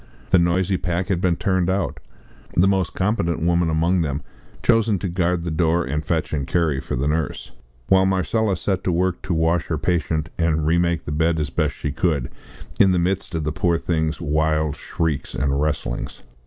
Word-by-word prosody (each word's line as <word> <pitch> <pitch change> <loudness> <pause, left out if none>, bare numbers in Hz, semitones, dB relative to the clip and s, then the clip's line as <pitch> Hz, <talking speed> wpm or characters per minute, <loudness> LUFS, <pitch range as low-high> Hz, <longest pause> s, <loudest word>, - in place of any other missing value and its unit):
The 90 - +6
noisy 90 +2 +2
pack 90 +1 -2
had 90 -3 0
been 90 -2 +2
turned 95 0 0
out; 95 -2 -1 0.6
the 90 +3 +4
most 95 -3 0
competent 95 -5 0
woman 85 0 +2
among 85 +3 +2
them 70 -1 -2 0.4
chosen 115 -3 +3
to 95 - -3
guard 90 -1 0
the 85 - -3
door 85 +1 +1
and 75 +3 -2
fetch 80 -1 -1
and 70 -3 -2
carry 80 -6 +1
for - - -4
the 65 +3 -1
nurse; 75 -1 -2 0.4
while 95 0 +4
Marcella 95 +1 +1
set 95 +2 -1
to 90 - +2
work 90 +1 0
to 95 -2 -2
wash 80 +1 +1
her - - -1
patient 80 -2 -1
and 80 -2 +1
remake 85 0 +1
the - - -4
bed 80 +2 +1
as 75 -3 -2
best 75 +2 0
she 75 - -3
could, 70 -6 0 0.5
in 95 -2 +6
the - - +2
midst 90 +1 -1
of 80 - -1
the 75 - -1
poor 85 +2 +1
thing's 80 -2 -1
wild 80 -1 0
shrieks 80 -5 -3
and 70 0 0
wrestlings. 75 -1 -3
85 Hz, 195 wpm, -22 LUFS, 80-90 Hz, 0.6 s, The